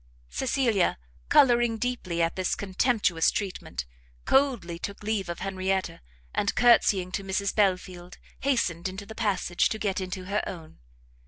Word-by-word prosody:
Cecilia, 235 - +1 0.3
colouring 240 -3 +5
deeply 215 -9 -1
at 165 - 0
this 185 -1 0
contemptuous 200 -3 +1
treatment, 185 - -4 0.4
coldly 245 -12 +2
took 200 +3 -6
leave 205 -4 -1
of 170 - -5
Henrietta, 190 - -2 0.3
and 200 - 0
courtsying 210 -6 +4
to 195 - -3
Mrs 195 +1 -1
Belfield, 185 -3 -1 0.2
hastened 190 -10 0
into 190 +2 -7
the 220 - -9
passage, 200 -6 0
to 220 - -3
get 200 -2 -1
into 185 0 -5
her 200 +2 0
own. 160 -3 -9
195 Hz, 140 wpm, -27 LUFS, 180-220 Hz, 0.4 s, colouring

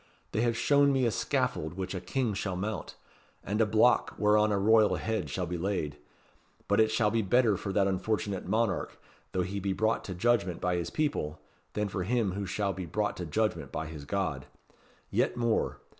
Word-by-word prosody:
They 110 - 0
have 115 -1 +1
shown 140 +1 +4
me 135 -2 +2
a 115 - +2
scaffold 80 -4 -1
which 95 0 -4
a 95 - -4
King 115 +5 -1
shall 95 -1 -2
mount 105 +4 -4 0.5
and 105 +4 0
a 110 - +4
block 110 +3 +3
whereon 105 0 +4
a 100 - +2
royal 110 +1 +4
head 110 -3 -2
shall 90 - -2
be 85 0 -4
laid. 85 -6 -2 0.7
But - - +2
it 110 0 +5
shall 110 -1 +2
be 115 +1 +2
better 110 +1 +3
for 100 +1 -4
that 95 0 +3
unfortunate 100 0 -1
monarch, 110 -3 0 0.3
though 90 - 0
he 100 +3 -3
be 100 0 -1
brought 110 +4 +1
to 95 - -5
judgment 100 -3 +1
by 90 0 0
his 85 -1 -2
people, 110 - -1 0.3
than 105 0 -1
for 95 -1 -3
him 110 +1 +1
who 100 +1 -4
shall 100 +1 -1
be 90 -2 -6
brought 105 +6 -1
to 90 - -4
judgment 85 -5 -1
by 80 - -3
his 75 -2 -8
God. 80 -7 -2 0.6
Yet - - +1
more. 115 -2 0
100 Hz, 200 wpm, -30 LUFS, 90-110 Hz, 0.7 s, it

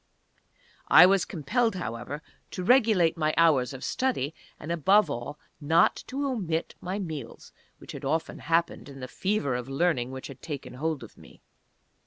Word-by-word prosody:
I - - +9
was 195 0 +3
compelled, 225 - 0
however, 145 -2 -5 0.3
to 185 - -5
regulate 210 -8 +4
my 155 0 +1
hours 145 -7 +4
of 135 -2 -8
study, 245 - -1 0.3
and 155 - -6
above 175 +2 +3
all 130 +3 -5 0.2
not 160 +3 +3
to 280 +2 -3
omit 185 -12 -2
my 185 +2 -3
meals, 155 - -7 0.2
which - - -11
had - - -8
often 160 +4 -2
happened 165 -1 -1
in 135 -1 -11
the 130 - -6
fever 185 -3 -1
of 125 +1 -4
learning 135 -4 0
which 130 0 -7
had 135 -2 -10
taken 145 -4 -7
hold 150 +1 -3
of 115 - -14
me. - - -17
160 Hz, 165 wpm, -27 LUFS, 135-185 Hz, 0.3 s, I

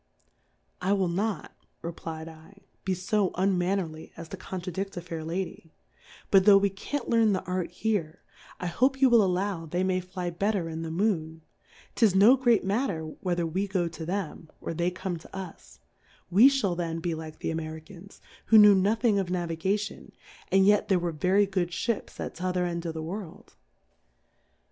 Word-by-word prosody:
I 190 +2 +2
will 190 -3 +1
not, 195 -1 -2 0.3
replfd 165 +2 -8
/, - - -42
be 190 -1 0
fo 190 +2 0
un 190 +1 +2
mannerly 175 -3 -2
as 165 -1 -9
to - - -6
contradi£t 185 +1 -5
a - - -3
fair 165 -2 -6
Lady; 170 -1 -5 0.6
but 195 - +7
tlio' 200 -2 +8
we 200 0 +1
can't 275 +9 -5
learn 225 -3 +3
the 185 - -2
Art 180 -2 -2
here, 180 -3 -2 0.4
t - - -4
hope 260 +10 +1
you 265 -2 +5
v^ill 235 -2 +7
allow 185 -2 -1
they 175 +4 -1
may 185 -1 +1
fly 180 -1 -5
bet 200 +5 0
ter 175 -4 -1
in 160 0 -5
the 165 - -4
Moon; 160 -3 -1 0.5
'tis 215 -6 +3
no 210 +7 +7
great 240 -5 +3
matter 195 -5 -1 0.2
whether 175 -2 0
we 185 +5 -1
go 185 -3 0
to 165 0 -8
them, 170 -2 -4
or - - -5
they 170 +2 0
come 180 0 -4
to 160 - -14
us, 160 - -9 0.5
we 220 +9 +8
fhall 250 -10 0
then 165 -1 -3
be 170 0 -2
like 160 -1 -7
the - - -3
Jmtri 160 -1 -5
cans^ 190 +3 -14 0.3
who 225 - +7
knew 210 -1 +9
nothing 210 +2 +2
of 190 - -1
Navigati 180 +4 -1
on, - - -16 0.4
and 195 0 +5
yet 205 0 +4
there 190 - +3
were 175 -1 -1
very 185 +6 +2
good 190 -3 -1
S!)ips 225 +5 -3
at - - -4
t'other 180 0 -1
end 170 -1 -3
of 165 - -4
the 160 - -4
World. 180 +1 -8
185 Hz, 185 wpm, -27 LUFS, 165-200 Hz, 0.6 s, knew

